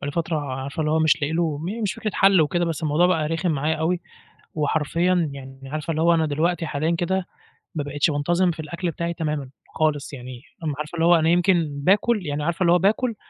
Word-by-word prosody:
بقى - - -5
لي - - -2
فترة 165 0 -1
عارفة 140 +1 -5
اللي 155 -1 0
هو 160 - +2
مش 160 -1 +3
لاقي 145 +3 0
له 160 -3 0
م 200 +9 -4
مش 205 - 0
فكرة 215 - -3
حل 195 -3 +5
وكده، 175 +3 +1
بس 165 -2 -3
الموضوع 155 +3 +3
بقى 165 -4 +1
رخم 165 +2 -1
معايا 155 +1 0
أوي 165 +3 0 0.5
وحرفيًا 160 +2 +1
يعني 135 -1 -10
عارفة 155 +4 -4
اللي 160 0 0
هو 170 +1 +5
أنا 160 -1 +2
دلوقتي 165 +3 0
حاليًا 155 +3 -1
كده 180 +2 -1 0.5
ما 150 - -1
بقيتش 145 +2 0
بانتظم 175 +5 +1
في 160 - -10
الأكْل 170 +3 -3
بتاعي 170 +1 -3
تمامًا، 150 -4 -3 0.3
خالص، 150 -2 0
يعني 125 -2 -8 0.4
عارفة 150 +3 -5
اللي 165 0 +1
هو 175 +1 +6
أنا 160 -1 +2
يمكن 175 -2 +3
باكل 205 +3 +2
يعني 145 0 -2
عارفة 170 +3 -2
اللي 170 - +4
هو 180 - +6
باكل 220 +5 +1
160 Hz, 220 wpm, -23 LUFS, 150-175 Hz, 0.5 s, هو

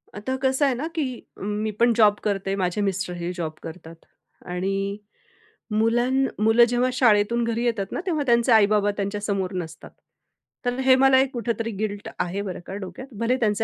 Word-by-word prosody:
आता 240 +6 -3
कसं 265 +2 +2
आहे 270 - +2
ना, 290 +6 -3
की 260 -6 -2 0.2
मी 210 +2 -2
पण 235 0 +4
जॉब 210 -2 +5
करते. 195 -1 -1
माझे 185 +1 -1
मिस्टरही 180 -3 -2
जॉब 160 -3 -3
करतात. 165 0 -9 0.5
आणि 195 +3 -2 0.7
मुलां 230 +4 +2 0.3
मुलं 225 +2 +6
जेव्हा 245 +1 +1
शाळेतून 235 -2 +3
घरी 230 +1 -1
येतात 205 -5 -1
ना, - - -3
तेव्हा 315 -6 0
त्यांचे 235 0 +3
आई-बाबा 210 -1 +4
त्यांच्यासमोर 200 -2 -2
नसतात. 160 0 -11 0.8
तर 245 0 0
हे 260 -1 +7
मला 265 0 +5
एक 270 0 -1
कुठेतरी 230 -1 -2
गिल्ट 205 -1 -3
आहे, 180 +3 -2
बरं 195 -3 -5
का, 190 - -6
डोक्यात. 205 +6 -7
भले 230 +2 +2
त्यांचे 220 -2 +1
215 Hz, 165 wpm, -24 LUFS, 195-240 Hz, 0.8 s, हे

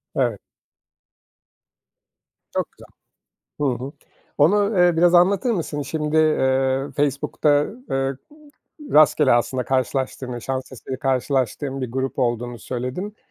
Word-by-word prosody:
Evet. 120 -6 0 2.1
Çok - - -1
güzel. - - -17 0.9
Hı 125 - -6
hı. 140 - -7 0.5
Onu, 200 +6 +3
eee, 175 -2 +4
biraz 175 +1 +4
anlatır 195 +6 +4
mısın? 160 -8 -2
Şimdi, 150 +2 -2
eee, 135 -3 +2
Facebook'ta, 145 +1 0
ııı, 225 +12 -6
ııı, 135 0 -1 0.7
rastgele 150 -2 +5
aslında 125 +2 +1
karşılaştığını, 130 -1 -2
şans 130 0 -4
eseri 130 +1 -7
karşılaştığın 135 +1 -1
bir 125 -3 -4
grup 130 +1 -3
olduğunu 120 -1 -1
söyledin. 130 - -5
135 Hz, 115 wpm, -22 LUFS, 130-155 Hz, 2.1 s, rastgele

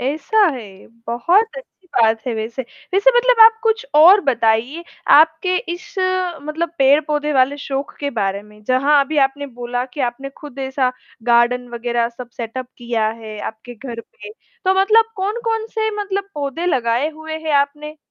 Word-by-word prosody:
ऐसा 305 - -1 0.2
है, 200 -6 -11 0.2
बहुत 360 - +1
अच्छी - - -13
बात 225 -1 +3
है 245 - -1
वैसे। 230 +4 -4 0.3
वैसे 405 +6 +5
मतलब 485 -1 +3
आप 445 0 +6
कुछ 450 +1 +1
और 355 +7 +8
बताइए 245 - 0 0.3
आपके 320 +4 +3 0.2
इस 410 +4 -13 0.5
मतलब 320 +3 -3
पेड़-पौधे 295 +2 +2
वाले 265 +1 +2
शौक 275 0 -4
के 285 -1 -2
बारे 200 0 -1
में। 210 0 -18
जहाँ 275 +5 +3
अभी 300 +1 -2
आपने 285 +1 -9
बोला 245 0 -4
कि 295 - -5
आपने 275 +3 -9
खुद 285 -3 -11
ऐसा 265 -1 -1 0.3
गार्डन 240 +1 +3
वग़ैरह 235 0 -1
सब 240 +1 -11
सेटअप 245 +2 -5
किया 235 -3 -1
है 215 -1 -8
आपके 220 +2 -8
घर 235 0 -7
पे। 470 - -13 0.3
तो 375 +1 +3
मतलब 445 +3 +4
कौन-कौन 445 +3 -2
से 440 0 0
मतलब 395 -1 -3
पौधे 290 +4 -3
लगाए 250 -3 +1
हुए 315 0 -7
हैं 315 -1 -3
आपने? 300 +2 -4
280 Hz, 160 wpm, -19 LUFS, 240-355 Hz, 0.5 s, और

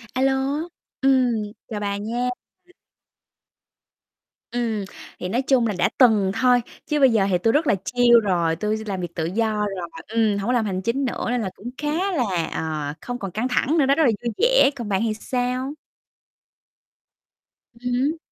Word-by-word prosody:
A 255 - 0
lô, 270 0 +3 0.7
ừm, 245 -6 +2 0.2
chào 215 -3 -4
bà 200 -1 -2
nha. 235 +4 -2 2.2
Ừm, 230 -4 -1 0.3
thì 180 - -4
nói 240 +7 +1
chung 260 -3 +2
là 210 - -1
đã - - +2
từng 215 -7 +5
thôi, 250 -1 +5 0.3
chứ 300 -1 0
bây 270 -2 +6
giờ 215 -4 +3
thì 180 - +3
tôi 225 +6 +1
rất 300 +2 +2
là - - +4
chill 240 -1 +5
rồi. 170 -5 +1
Tui 210 +5 -1
s - - -7
làm 190 -3 -3
việc 170 -1 -6
tự 160 - -1
do 215 +5 0 0.2
rồi, 170 -1 -5 0.2
ừm, 220 -2 +1
hổng 200 +1 -3
có 250 - +2
làm 235 -3 +2
hành 190 -2 -2
chính 235 +7 -1
nữa 250 - -3
nên 245 0 0
là 195 - -2
cũng 240 - -8
khá 325 +7 -1
là, 195 - 0
ờ, 155 -2 -3
không 245 0 -4
còn 195 -2 -5
căng 220 +7 -1
thẳng 275 +5 +1
nữa 280 - +4
đó, 275 - +3
rất 320 - +3
là 245 - +5
vui 235 - -1
vẻ. - - +5
Còn 235 -6 -6
bạn 195 0 +1
thì 220 - 0
sao? 250 +4 -2 2.1
Ừm 245 +1 -3
hứm. 280 +6 +1
230 Hz, 195 wpm, -23 LUFS, 200-255 Hz, 2.2 s, bây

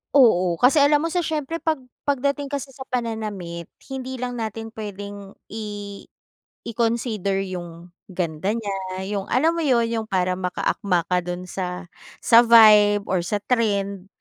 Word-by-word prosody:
Oo 185 -10 +5
kasi 255 - +4
alam 290 +1 +4
mo 330 - -1
sa 355 - +1
siyempre 320 -1 -2
pag 315 -4 -1 0.3
pagdating 280 +1 0
kasi 275 -1 -5
sa 265 0 -10
pananamit 210 -8 -4 0.2
hindi 260 -1 -5
lang 245 -1 -4
natin 225 0 -5
pwedeng 205 -2 -8 0.2
i 205 -2 -6 0.6
i-consider 225 -4 -1
yung 175 -1 -8 0.2
ganda 175 -1 -2
niya 210 -4 -3 0.4
yung 200 -2 -2
alam 310 +6 +3
mo 335 - -1
yun 245 -4 +3
yung 225 -1 -2
parang 185 -2 0
maka-akma 180 0 0
ka 180 - +4
dun 175 +1 -5
sa 180 0 -5 0.4
sa 230 - +7
vibe 210 -3 +7
or 185 - +2
sa 205 +4 -2
trend, 200 -5 0
215 Hz, 150 wpm, -23 LUFS, 190-250 Hz, 0.6 s, sa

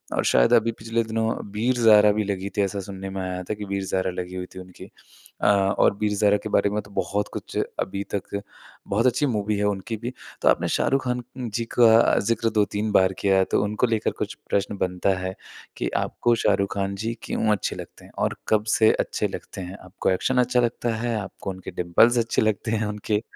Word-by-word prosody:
और - - +1
शायद - - +4
अभी 115 - +4
पिछले 115 +1 -1
दिनों 110 0 -1 0.2
वीर-ज़ारा 110 -1 +5
भी 105 +1 0
लगी 100 -1 -3
थी, - - +3
ऐसा 100 0 -1
सुनने 95 0 -7
में 95 0 -4
आया 90 0 -3
था 100 - -3
कि 105 0 -6
वीर-ज़ारा 95 -1 -1
लगी 90 0 -6
हुई 90 0 -4
थी 95 - -7
उनकी। 90 -1 -12 0.5
अ, - - +2
और 100 -1 +3
वीर-ज़ारा 105 -1 +3
के 110 - -4
बारे 100 - +3
में 105 +1 -2
तो 100 0 -17
बहुत 100 +1 -1
कुछ - - -6 0.2
अभी 100 +1 -2
तक 100 0 -4 0.5
बहुत 110 +5 +1
अच्छी 145 +4 +2
मूवी 105 -5 0
है 105 - 0
उनकी 105 +2 -3
भी। 120 +3 -5 0.3
तो - - +1
आपने - - +2
शाहरुख 135 0 +1
खान 125 0 0 0.2
नं 125 -3 -4
जी 115 +2 -2
का, 115 -1 +5
ज़िक्र 115 +1 0
2-3 105 0 0
बार 95 -2 +4
किया 95 -1 +3
है, 95 - +4
तो - - +1
उनको 105 +4 0
लेकर 110 -2 0
कुछ - - -2 0.2
प्रश्न 100 0 0
बनता 90 0 0
है, 95 0 -4 0.4
कि - - -1
आपको 120 -1 +1
शाहरुख 100 0 +2
खान 100 0 -2
जी 110 +4 -3
क्यों 110 - 0
अच्छे 105 - -1
लगते - - -10
हैं? - - -16
और - - 0
कब 105 -1 +3
से 110 -1 +6
अच्छे - - 0
लगते 95 - -8
हैं? 90 +2 -7
आपको 95 - -2
एक्शन 125 +7 +1
अच्छा 125 0 +3
लगता 120 0 0
है? 115 +1 -2
आपको 95 0 -7
उनके 95 -1 -7
डिंपल्स 90 +8 +3
अच्छे 115 -1 +1
लगते 110 +1 0
हैं? 110 -1 0
उनके 105 0 -1
105 Hz, 215 wpm, -24 LUFS, 95-115 Hz, 0.5 s, से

